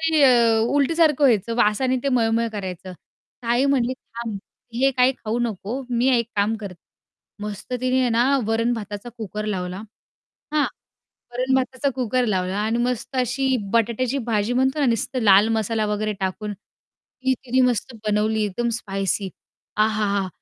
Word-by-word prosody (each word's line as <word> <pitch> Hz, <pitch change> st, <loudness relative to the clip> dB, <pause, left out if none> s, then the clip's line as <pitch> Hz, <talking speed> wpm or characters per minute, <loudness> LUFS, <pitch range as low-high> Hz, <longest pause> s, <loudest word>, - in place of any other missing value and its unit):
ते 320 Hz, -2 st, +2 dB
अ, 235 Hz, -4 st, +5 dB, 0.2 s
उलटीसारखं 300 Hz, 0 st, +3 dB
व्हायचं. 230 Hz, -2 st, +3 dB
वासाने 245 Hz, +3 st, +2 dB
ते -, -, +2 dB
मळमळ 230 Hz, -2 st, +2 dB
करायचं. 185 Hz, -2 st, -6 dB, 0.5 s
ताई 240 Hz, +3 st, +2 dB
म्हणाली, 260 Hz, -3 st, +2 dB
"थांब 230 Hz, -5 st, -7 dB, 0.4 s
हे 270 Hz, +3 st, +3 dB
काही 255 Hz, 0 st, +3 dB
खाऊ 225 Hz, +2 st, -2 dB
नको, 235 Hz, +2 st, -3 dB
मी 245 Hz, +2 st, +2 dB
एक 235 Hz, 0 st, -2 dB
काम 205 Hz, +2 st, +2 dB
कर" 200 Hz, -3 st, -7 dB, 0.7 s
मस्त 210 Hz, +3 st, -6 dB
तिने 255 Hz, +1 st, +1 dB
आहे 255 Hz, -, +2 dB
ना, 235 Hz, +2 st, +3 dB, 0.2 s
वरण-भाताचा 225 Hz, -1 st, -2 dB
कुकर 210 Hz, 0 st, -5 dB
लावला, 180 Hz, -3 st, -3 dB, 0.8 s
हां? 300 Hz, -1 st, +3 dB, 0.7 s
वरण-भाताचा 260 Hz, +2 st, 0 dB
कुकर 255 Hz, 0 st, 0 dB
लावला 190 Hz, -2 st, -1 dB
आणि 220 Hz, +2 st, 0 dB
मस्त 250 Hz, +2 st, -2 dB
अशी 260 Hz, +2 st, +1 dB, 0.2 s
बटाट्याची 235 Hz, +3 st, +1 dB
भाजी 215 Hz, +2 st, +1 dB
म्हणतो 265 Hz, +4 st, +1 dB
ना 285 Hz, -, +3 dB
नुसतं 240 Hz, +2 st, 0 dB
लाल 200 Hz, +1 st, +6 dB
मसाला 220 Hz, 0 st, 0 dB
वगैरे 210 Hz, 0 st, -1 dB
टाकून, 200 Hz, +2 st, -3 dB
ती 260 Hz, +5 st, -6 dB
तिने 255 Hz, +1 st, +2 dB
मस्त 245 Hz, +1 st, -2 dB
बनवली, 215 Hz, +1 st, +1 dB
एकदम 235 Hz, +4 st, -2 dB
स्पायसी. 195 Hz, -1 st, -2 dB, 0.5 s
आहाहा! 210 Hz, -3 st, +1 dB
230 Hz, 145 wpm, -23 LUFS, 210-255 Hz, 0.8 s, लाल